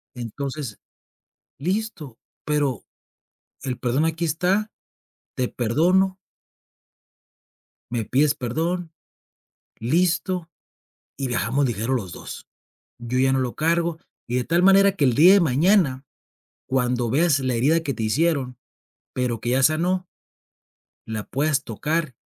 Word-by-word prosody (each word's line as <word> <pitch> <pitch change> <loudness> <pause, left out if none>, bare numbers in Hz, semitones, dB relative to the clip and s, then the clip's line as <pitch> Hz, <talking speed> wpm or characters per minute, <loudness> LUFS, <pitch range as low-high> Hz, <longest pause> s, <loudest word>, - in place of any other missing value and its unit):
Entonces, 130 +1 -5 0.8
listo, 180 - -3 0.3
pero, 145 -4 0 0.8
el 130 -3 -3
perdón 130 +5 +1
aquí 165 +1 -1
está, 185 +7 0 0.6
te 125 - 0
perdono 175 +11 +2 1.8
me 115 -2 -2
pides 140 +6 +2
perdón, 160 +6 -3 0.9
listo, 170 +6 0 0.7
y 135 - -2
viajamos 125 +5 0
ligero 120 +1 -1
los 105 -9 -2
2. - - -9 0.5
Yo 120 +1 -3
ya 135 0 +3
no 135 - +2
lo 125 -2 -2
cargo, 165 +1 0 0.3
y 120 - -2
de 125 - +1
tal 170 +6 +1
manera 195 +1 +6
que 165 -7 +1
el 125 - +3
día 175 +6 +8
de 200 - +6
mañana, 150 -2 +2 0.6
cuando 125 -2 0
veas 145 +2 +3
la 130 -2 -1
herida 145 +8 +3
que 140 -4 -3
te 115 - -5
hicieron, 130 +1 0 0.6
pero 125 -3 -1
que 120 +3 -2
ya 130 +1 +2
sanó 175 +5 +2 1.0
la 110 -2 -4
puedas 140 0 0
tocar 150 +5 -2
140 Hz, 125 wpm, -23 LUFS, 125-170 Hz, 1.8 s, día